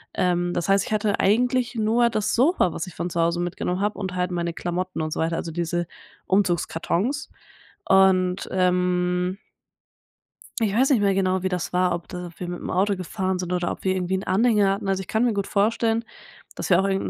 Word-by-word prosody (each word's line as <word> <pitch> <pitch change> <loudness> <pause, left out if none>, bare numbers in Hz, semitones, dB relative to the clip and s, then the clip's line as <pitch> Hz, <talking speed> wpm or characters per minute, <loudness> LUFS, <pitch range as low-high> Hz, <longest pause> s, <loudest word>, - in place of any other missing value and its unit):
Ähm, 175 -1 +1
das 175 -1 -2
heißt, 195 0 +3
ich - - -8
hatte 210 -1 +1
eigentlich 245 +4 +2
nur 230 +2 +2
das 215 -2 -1
Sofa, 255 - +3
was 160 - -4
ich 175 - -11
von 175 - -3
zu 170 -1 -1
Hause 170 +1 +1
mitgenommen 180 +1 -2
habe. 210 +1 -1
Und 190 -3 -4
halt 180 0 0
meine 170 -1 -1
Klamotten 180 +1 -3
und 155 0 -2
so - - -2
weiter. 165 +1 0
Also, 165 - -4
diese 175 0 -2 0.4
Umzugskartons 190 - 0 0.6
und, 190 -1 +3
ähm 180 0 +1 1.2
ich 210 -3 +1
weiß 260 +4 +4
nicht 260 -6 +3
mehr 200 -1 +3
genau, 190 -1 +1
wie 190 - -1
das 180 -2 -3
war. 180 0 +2
Ob 175 - -6
da 180 -1 -6
wir 180 - -5
mit’m 175 0 -5
Auto 195 +2 +1
gefahren 185 +1 -2
sind 180 0 -4
oder 180 -1 0
ob - - -7
wir 190 -1 +2
irgendwie 185 0 -1
'n 190 - -2
Anhänger 210 -1 +3
hatten. 200 0 -4
Also, 190 0 +1
ich - - -12
kann 220 +2 +1
mir 235 - +1
gut 200 -1 -1
vorstellen, 225 +2 +1 0.5
dass - - -5
wir 180 0 +6
auch 195 - 0
irgend 195 0 0
185 Hz, 210 wpm, -24 LUFS, 180-205 Hz, 1.2 s, wir